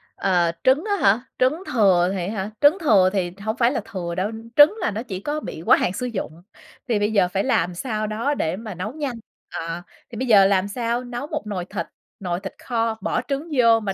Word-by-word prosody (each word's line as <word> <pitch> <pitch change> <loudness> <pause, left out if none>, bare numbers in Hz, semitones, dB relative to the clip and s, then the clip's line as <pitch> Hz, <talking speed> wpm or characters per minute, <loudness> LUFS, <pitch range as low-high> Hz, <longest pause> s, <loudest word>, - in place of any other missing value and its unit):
Ờ, 175 -3 +2
trứng 265 +5 +4
á 405 - +2
hả, 200 +3 +4 0.2
trứng 285 +8 +2
thừa 185 -6 +4
thì 185 -3 -2
á - - -3
hả? 195 -1 -3
Trứng 295 +5 +6
thừa 205 - +4
thì 180 -3 -1
hổng 220 +2 -2
phải 235 -1 +3
là 275 - -2
thừa 180 -6 -5
đâu. 190 +4 -1 0.2
Trứng 295 +7 +7
là - - 0
nó 215 +3 -4
chỉ 195 -7 -6
có 295 +9 -3
bị 160 - -7
quá - - +6
hạn 180 - 0
sử 250 +6 -3
dụng. 190 -8 -5 0.5
Thì 230 -4 +1
bây 205 +1 +1
giờ 200 -4 +3
phải 190 +2 -1
làm 180 -9 +1
sao 215 +1 -3
đó 225 +7 -1
để 165 - -1
mà 215 +1 -7
nấu 185 +5 -4
nhanh. 285 -5 -3 0.4
Ờ, 165 +1 -4 0.3
thì 230 - -9
bây 255 +2 -2
giờ 200 -4 +7
làm 195 0 +2
sao 235 +3 -2
nấu 245 +3 -6
một 305 -7 -4
nồi 185 -4 -3
thịt - - -4 0.3
nồi 175 -2 -2
thịt 195 0 -7
kho 230 -2 -1
bỏ - - -1
trứng 285 +4 -3
vô, 230 -2 +5
mà 200 -3 -3
215 Hz, 235 wpm, -22 LUFS, 190-250 Hz, 0.5 s, Trứng